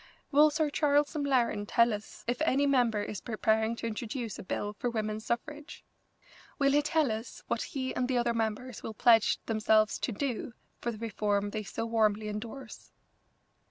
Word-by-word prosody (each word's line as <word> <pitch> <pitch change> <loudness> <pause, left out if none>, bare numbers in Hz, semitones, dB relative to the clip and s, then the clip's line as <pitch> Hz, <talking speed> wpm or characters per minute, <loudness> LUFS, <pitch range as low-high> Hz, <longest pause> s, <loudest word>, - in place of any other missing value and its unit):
Will 300 +2 +6
Sir 305 0 0
Charles 290 +1 +2
M'Laren 245 -8 +1
tell 235 0 +4
us 210 0 -8
if 245 +5 -1
any 285 -3 +3
member 240 -6 +2
is 205 -4 -5
preparing 220 +1 +1
to 230 - -6
introduce 230 0 -4
a - - -7
bill 205 +2 -3
for 245 +4 -2
women's 215 -1 -3
suffrage? 295 +5 -4 0.7
Will 275 -1 +3
he 290 +1 +4
tell 300 -3 +1
us 220 +2 -6
what - - -1
he 260 -2 -3
and 250 - -1
the 255 -1 0
other 240 -1 +1
members 225 +2 -3
will 220 - -6
pledge 225 -2 +5
themselves 215 -1 +2
to - - -2
do 240 +1 -3 0.3
for 240 - -2
the 220 - -8
reform 205 -2 -1
they 215 - -3
so 215 +2 -4
warmly 215 -2 +1
endorse?" 225 +3 -8
230 Hz, 175 wpm, -30 LUFS, 215-270 Hz, 0.7 s, Will